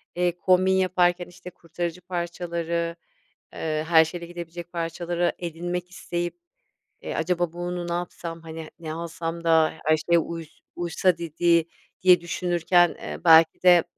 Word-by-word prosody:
eee, 175 0 +2
kombin 185 +1 +3
yaparken 180 -1 +2
işte 175 0 -11
kurtarıcı 175 0 -5
parçaları, 170 -1 -3 0.6
ııı, 155 -1 -2
her 160 0 +6
şeyle 170 +2 -7
gidebilecek 175 0 -8
parçaları 170 +1 -1
edinmek 175 +1 -4
isteyip. 175 - -4 0.6
E, - - -5
acaba 175 0 0
bunu 175 0 -4
ne 170 - -2
yapsam, 170 -1 -5
hani, 160 -1 -8
ne 160 -2 -5
alsam 165 0 -5
da 160 -1 +4
her 155 +1 +4
şeye 170 +2 +2
uys 165 -1 -7 0.2
uysa 175 +1 +1
dedi 170 0 +2 0.4
diye 180 -2 +7
düşünürken, 175 0 +2
eee, 75 -1 -6
belki 160 +1 +6
de, 175 -2 +7
170 Hz, 135 wpm, -25 LUFS, 165-175 Hz, 0.6 s, diye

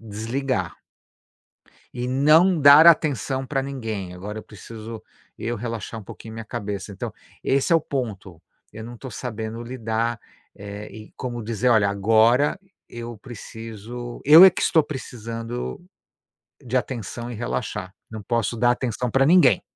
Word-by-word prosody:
desligar" 115 -1 -3 1.2
"e 125 0 -3
não 155 +7 +4
dar 145 +3 +9
atenção 140 -4 +3
pra 135 -1 -1
ninguém, 110 -9 -5
agora 105 +4 -7
eu - - -7
preciso 110 +2 -10 0.4
eu 120 +1 -3
relaxar 115 0 -5
um 100 - -13
pouquinho 110 +3 -10
minha 115 0 -7
cabeça." 105 -3 -5
Então, 95 - -6 0.3
esse 135 +5 +1
é - - +7
o 165 - +1
ponto. 105 - -5 0.3
Eu 110 - -8
não 120 +1 -9
tô 130 +3 -9
sabendo 110 -1 -5
lidar, 115 -1 -2 0.4
eh, 100 +1 -8
e 110 0 -12
como 120 -2 -5
dizer: 115 +3 -1
"Olha, 110 -4 +4
agora 110 - +3 0.3
eu 120 0 -7
preciso 115 0 -9
eu 155 +6 +10
é 190 - +10
que - - -5
estou 160 - +4
precisando 120 - -6 0.8
de 125 +1 -2
atenção 120 -1 -3
e - - -6
relaxar, 105 -4 -4 0.2
não 110 -1 -7
posso 115 +2 -1
dar 120 +1 +4
atenção 125 -1 -2
pra 135 +3 +3
ninguém." 150 - +5
115 Hz, 150 wpm, -23 LUFS, 110-130 Hz, 1.2 s, eu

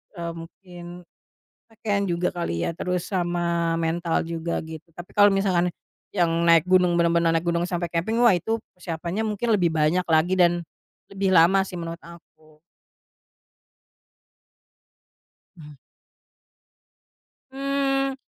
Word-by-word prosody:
eee, 170 -1 -4
mungkin 175 +2 -11 0.9
pakaian 205 -3 -2
juga 175 +1 -1
kali 125 - -3
ya, - - -1
terus 180 +1 -3
sama 170 -2 0
mental 165 0 -1
juga 165 0 -3
gitu, 160 +1 -10
tapi 175 +1 -10
kalo 205 0 +6
misalkan 195 -3 +1 0.4
yang 175 -4 +1 0.2
naik 165 -1 +6
gunung, 180 -1 +3
benar-benar 170 -1 +2
naik 165 - -1
gunung 170 0 0
sampai 175 -1 -3
camping 170 +7 -1
wah 235 - +7
itu 190 +6 0 0.2
persiapannya 170 +2 -5
mungkin 220 +2 -1
lebih 185 -5 +3
banyak 160 +3 +1
lagi 165 +3 +3
dan, 175 -1 +3 0.5
lebih 195 0 -1
lama 175 +4 +6
sih 180 - -7
menurut 170 0 -6
aku. 155 -2 -17 3.0
Mmm. 150 -3 -13 1.8
Mmm, 275 0 0
175 Hz, 120 wpm, -24 LUFS, 165-185 Hz, 3.0 s, wah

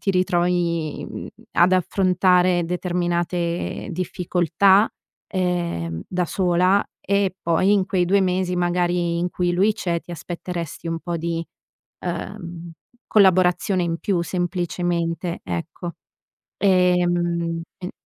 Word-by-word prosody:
ti 195 - 0
ritrovi, 175 -3 0
mhmm, - - -7 0.3
ad 180 +2 +4
affrontare 180 -1 +3
determinate 175 0 -2
difficoltà, 180 +3 +2 0.4
ehm, 170 - -2
da 180 -1 -1
sola 180 +2 +2
e 200 -1 +1
poi 170 +4 +3
in 195 -2 +3
quei 180 -2 +1
2 195 +3 +3
mesi 185 -1 0
magari 175 -1 +1
in 175 +1 0
cui 175 -1 0
lui 200 +5 +3
c'è 175 -6 -2
ti 175 - -10
aspetteresti 170 0 -6
un 165 0 -2
po' 175 0 -3
di, 165 0 -2 0.6
uhm, 175 -1 -5 0.4
collaborazione 185 -1 +4
in 170 -1 -1
più 180 -4 0
semplicemente, 175 -1 -2
ecco. 165 - -5 0.7
Ehm, 175 -3 +2 0.2
e 180 0 -6
175 Hz, 115 wpm, -22 LUFS, 170-185 Hz, 0.7 s, ad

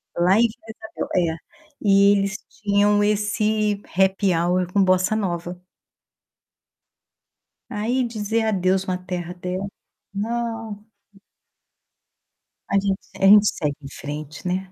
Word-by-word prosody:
Lá 180 +3 +3
em - - +5
Vila - - -10 0.2
Isabel, 220 0 -7 0.3
é. - - -11 0.4
E 200 -1 +5
eles 200 0 +1
tinham 205 0 +2
esse 210 0 0 0.2
happy 190 0 +3
hour 180 +2 0
com 200 +1 +3
bossa 185 +2 +2
nova. 175 -3 -3 2.1
Aí, 240 +4 -1
dizer 220 0 -1
adeus 190 -3 +1
uma 185 -1 -2
terra 180 -1 -5
dessa 180 +2 -4 0.5
não. 225 0 -4 1.9
A - - +2
gente 195 -1 0
se - - -18
a - - +1
gente 205 +1 +8
segue 150 -6 -1
em - - -7
frente, 150 +4 -7
né. 185 +1 -2
200 Hz, 120 wpm, -22 LUFS, 180-210 Hz, 2.1 s, gente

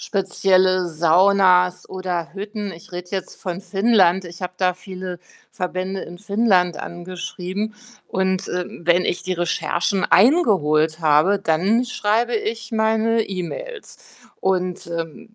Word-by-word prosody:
spezielle 185 -1 +2
Saunas 180 +2 +3
oder 180 -3 -4
Hütten? 205 +1 -5
Ich 170 +1 -13
rede 180 0 -6
jetzt 190 -2 -4
von 180 -1 -4
Finnland. 195 -3 +3
Ich 175 +1 -10
habe 180 - -3
da 185 -1 +2
viele 185 -1 -8 0.3
Verbände 185 +1 -4
in 175 +1 -10
Finnland 200 -5 +2
angeschrieben. 185 +4 -5 0.3
Und, 190 0 -1
äh, 180 0 -2 0.2
wenn 175 +2 +3
ich - - -2
die 185 - -1
Recherchen 175 +2 -1
eingeholt 170 - +3
habe, 160 +6 +3
dann 195 +8 +2
schreibe 235 0 0
ich 225 +1 -4
meine 225 +1 +2
E-Mails. 305 - -6 0.4
Und, 185 -1 -1
ähm, 170 +5 -6
185 Hz, 125 wpm, -21 LUFS, 175-205 Hz, 0.4 s, Saunas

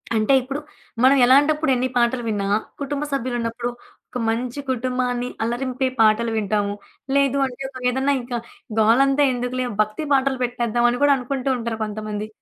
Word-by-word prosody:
అంటే 215 +5 +3
ఇప్పుడు 270 +3 -4 0.4
మనం 270 +2 +6
ఎలాంటప్పుడు 290 +3 +4
ఎన్ని 255 +1 0
పాటలు 240 +1 +1
విన్నా, 200 -2 -1 0.3
కుటుంబసభ్యులున్నప్పుడు 255 -5 -2 0.4
ఒక 250 - -5
మంచి 245 +4 -2
కుటుంబాన్ని 250 0 -1
అల్లరింపే 255 +2 -1
పాటలు 220 +1 +3
వింటాము. 205 -1 0 0.4
లేదు 280 -1 +3
అంటే 260 0 -7
ఒక 260 -1 -10
ఏదన్నా 265 +2 +1
ఇంక 240 -1 -4 0.4
గోలంతా 270 +6 +4
ఎందుకులే 250 +1 -2
భక్తి 215 +9 -2
పాటలు 265 -1 +2
పెట్టేద్దామని 240 +1 0
కూడా 285 -1 +6
అనుకుంటూంటారు 250 -3 -2
కొంతమంది. 215 0 -5
250 Hz, 130 wpm, -22 LUFS, 230-270 Hz, 0.4 s, మనం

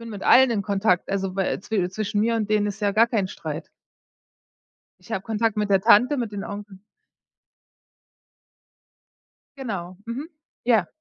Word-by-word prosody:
bin 230 0 -8
mit 205 -2 -7
allen 260 -1 +6
in 210 - 0
Kontakt, 200 -2 +1
also 195 -1 -2
wä 195 -1 -1
zwi 195 -4 -1
zwischen 205 +1 -2
mir 230 +1 +1
und 215 -1 -2
denen 210 -1 +2
ist 205 +2 -6
ja 205 -1 +2
gar 225 +3 +4
kein 215 -5 0
Streit. - - -6 1.3
Ich - - -14
habe 195 -3 -2
Kontakt 220 0 -1
mit 210 -1 0
der 195 - +4
Tante, 250 +9 +5
mit 235 -4 -3
den 200 -1 -5
Onkel. 205 -1 -8 2.8
Genau, 185 -9 -5
mhm, 260 +8 -5 0.4
ja. 220 -8 +3
210 Hz, 160 wpm, -24 LUFS, 195-230 Hz, 2.8 s, allen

